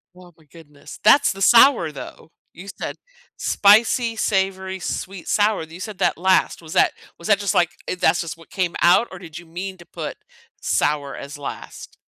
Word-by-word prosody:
Oh, 180 -1 -16
my 160 - -24
goodness, 150 -2 -14
that's 280 +7 +5
the 195 - -8
sour, 230 - +5
though! 150 +2 -11 0.2
You 180 +4 -12
said, - - -4 0.4
"Spicy, 225 +3 +3
savory, 190 -2 -1
sweet, 185 0 -6
sour," 210 -3 +1
you 160 +2 -11
said 205 0 -7
that - - +1
last, 185 0 +1
was 160 - -9
that - - +3 0.3
was 170 - -8
that 205 - +4
just, 200 -2 -1
like, 175 -2 +3 0.2
eh, - - -2
"That's 180 - +2
just 165 -2 -6
what 165 - -18
came 180 -3 -2
out," 180 +7 +5
or 185 - -9
did 165 -3 -11
you 175 - -10
mean 185 +3 -7
to 175 - -15
put - - -7 0.4
sour 145 -2 -1
as 140 +2 -9
last? 145 - -9
185 Hz, 190 wpm, -21 LUFS, 165-200 Hz, 0.4 s, that's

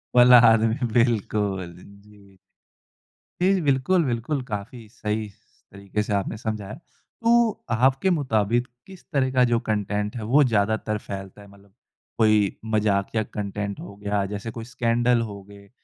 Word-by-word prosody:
वल्ला 125 0 +8
आदमी 115 +3 +1
बिल्कुल, 105 -6 0
जी। 100 0 -18 1.0
जी, 190 0 +3
बिल्कुल, 145 +5 +2
बिल्कुल, 125 +4 -2
काफ़ी 110 +1 -7
सही 105 0 -3
स 100 - -29
तरीके 100 +1 -4
से 105 - -3
आपने 100 +2 -2
समझाया। 110 -2 -5
तो, 230 +7 -1
आपके 130 +9 +2
मुताबिक 120 -2 0 0.2
किस 190 -2 -13
तरह 130 -2 +1
का 125 -1 +3
जो 115 - +3
कन्टेंट 105 +1 -1
है 110 - -5
वो 150 0 +7
ज़्यादातर 110 -2 0
फैलता 95 +1 -7
है? 100 - -14
मतलब 100 0 -20 0.4
कोई 110 -3 +3
मज़ाकिया 105 0 0
कन्टेंट 100 0 -4
हो 100 - -9
गया, 100 -1 0
जैसे 105 +3 -5
कोई 115 - -7
स्कैंडल 120 0 +2
हो 100 -1 -9
गए 100 0 -15
110 Hz, 145 wpm, -24 LUFS, 100-125 Hz, 1.0 s, वल्ला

